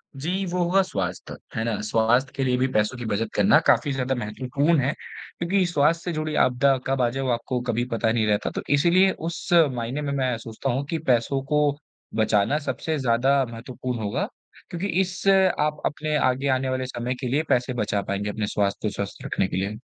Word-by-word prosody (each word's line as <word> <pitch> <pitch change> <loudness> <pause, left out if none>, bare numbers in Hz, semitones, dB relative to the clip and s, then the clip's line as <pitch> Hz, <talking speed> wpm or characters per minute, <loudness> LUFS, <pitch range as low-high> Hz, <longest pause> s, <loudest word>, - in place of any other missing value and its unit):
जी, 180 +8 -2
वो 180 0 -2
होगा 190 +3 +3
स्वास्थ्य, 95 - -4 0.2
है 110 - -1
ना? 115 -2 -1
स्वास्थ्य 115 +4 +2
के 135 - -1
लिए 125 -1 +1
भी 130 +1 +2
पैसों 105 +4 +1
की 120 - -6
बचत 110 +1 -1
करना - - +5
काफ़ी 145 - +4
ज़्यादा 130 0 -1
महत्वपूर्ण 130 +8 0
है 135 +3 +1
क्योंकि 185 +2 -3
स्वास्थ्य 165 0 +2
से 175 - -3
जुड़ी 155 0 -2
आपदा 130 +2 +3
कब 135 0 +1
आ 120 - +3
जाए 135 +2 -3
वो 130 - -1
आपको 120 +2 -1
कभी 120 +1 +1
पता 115 -1 +1
नहीं 115 -2 +1
रहता। 105 -1 +1
तो - - -2
इसीलिए 175 +6 +4
उस 170 +1 -6 0.2
मायने 125 +3 -3
में 145 -1 -2
मैं 130 -3 0
सोचता 115 +3 -5
हूँ 135 +3 -1
कि 165 - -1
पैसों 125 +3 +1
को 150 0 +4 0.5
बचाना 110 +4 +2
सबसे 155 +1 -3
ज़्यादा 130 +3 +3
महत्वपूर्ण 120 +1 -5
होगा 105 -1 -2 0.4
क्योंकि 175 +3 -3
इस 185 +1 -4
आप 185 -6 +3
अपने 155 0 -1
आगे 130 0 +1
आने 130 0 +1
वाले 130 0 -1
समय 125 0 -3
के 125 0 -5
लिए 145 +5 +1
पैसे 125 +1 +1
बचा 105 -3 -1
पाएँगे, 100 +1 -3
अपने 105 0 -2
स्वास्थ्य 100 +1 -1
को 105 - -1
स्वस्थ 100 -1 -5
रखने 95 - 0
के - - -4
लिए। 100 +3 -2
130 Hz, 205 wpm, -24 LUFS, 115-150 Hz, 0.5 s, करना